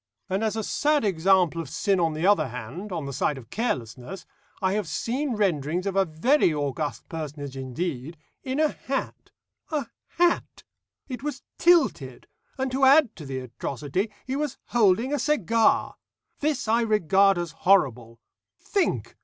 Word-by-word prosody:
And, 195 +3 0
as 220 -1 0
a 220 - -2
sad 295 +3 +1
example 180 -2 +3
of 155 - -8
sin 195 +4 +1
on 165 -2 +1
the 155 +3 -2
other 205 -5 +4
hand, 125 - -7
on 165 -5 -3
the 140 - -5
side 145 +2 0
of 120 -3 -12
carelessness, 135 - -3 0.3
I 190 0 +1
have 210 -3 -1
seen 245 - -2
renderings 175 -3 0
of 195 -1 -2
a 195 0 +4
very 175 - +2
august 145 0 -3
personage 145 -4 -6
indeed, 135 +3 -4 0.3
in 265 +2 -2
a 310 -1 +4
hat 270 -1 -5 0.4
a 305 -3 -1 0.3
hat! 350 0 +1 0.4
It 250 -4 -6
was 290 -1 -5 0.2
tilted, 345 -1 +2 0.3
and 265 -1 -1
to 270 +1 -1
add 270 -3 +6
to 155 -5 -9
the 135 -1 -4
atrocity, 140 - -3 0.2
he 260 - -3
was 290 -2 -2
holding 230 +3 +3
a 290 - 0
cigar. 230 - +2 0.4
This 290 -5 -1
I 230 +2 +3
regard 195 -3 +3
as 175 -2 -3
horrible. 130 - +2 0.4
Think! 395 -3 -1
190 Hz, 160 wpm, -25 LUFS, 150-250 Hz, 0.4 s, add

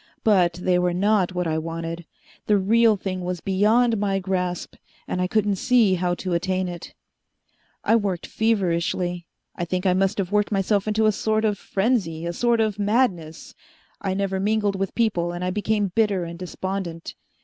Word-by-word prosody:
But 185 -6 +4
they 180 +1 +1
were 180 -1 0
not 190 -1 +2
what 180 0 -1
I 160 -1 0
wanted. 165 +1 -5 0.4
The 210 - +4
real 220 +2 +4
thing 185 -1 -4
was 180 0 -3
beyond 215 +5 +2
my 200 -1 0
grasp, 180 -2 -2 0.3
and 180 - -2
I 180 - +1
couldn't 205 0 +1
see 245 -4 +3
how 180 -1 0
to 185 0 -4
attain 185 +2 0
it. 175 -1 -8 0.9
"I 225 - +3
worked 195 -6 -1
feverishly. 180 -4 -1 0.3
I - - -3
think 180 +2 -2
I 185 - +4
must 195 +2 +1
have 190 -2 -2
worked 210 0 +1
myself 200 +1 +1
into 215 +1 +2
a 215 - +5
sort 215 +1 0
of 205 -2 0
frenzy, 195 -7 -1
a 170 - -2
sort 235 +4 +1
of 215 -2 -1
madness. 200 -7 0 0.5
I 190 -1 -1
never 195 -1 -1
mingled 205 0 +1
with 195 0 -3
people, 175 -7 0
and 175 +1 -5
I 180 - -1
became 210 0 0
bitter 205 -4 +1
and 170 0 -7
despondent. 185 -2 -5
190 Hz, 180 wpm, -23 LUFS, 180-210 Hz, 0.9 s, a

